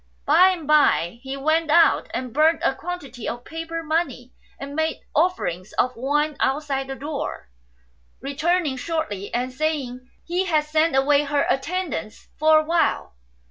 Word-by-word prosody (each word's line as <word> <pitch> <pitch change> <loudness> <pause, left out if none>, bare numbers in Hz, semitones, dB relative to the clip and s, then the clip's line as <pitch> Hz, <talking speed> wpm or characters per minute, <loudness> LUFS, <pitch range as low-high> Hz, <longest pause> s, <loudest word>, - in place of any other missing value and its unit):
By 345 +6 +6
and 350 -4 -3
by 275 - +3
he 270 +1 -6
went 315 +3 +1
out 335 +2 +4
and 250 -3 -4
burnt 315 +3 +3
a - - +3
quantity 275 -6 -6
of 240 +1 -7
paper 330 0 -5
money 305 -6 -2 0.2
4 - - -6
and 280 +1 -9
made 315 0 -1
offerings 250 - 0
of 250 0 0
wine 295 +4 0
outside 270 -1 -1
the 270 - -5
door, 285 - -5 0.7
returning 300 +2 0
shortly 255 - -3
and 250 +1 -2
saying 260 -4 -3 0.2
he 355 +3 -1
had 310 -4 +2
sent 310 -1 +1
away 285 +2 +3
her 285 0 +1
attendants 290 - -3
for 310 +1 +6
a 310 - +3
while. 330 - 0
295 Hz, 155 wpm, -23 LUFS, 265-325 Hz, 0.7 s, By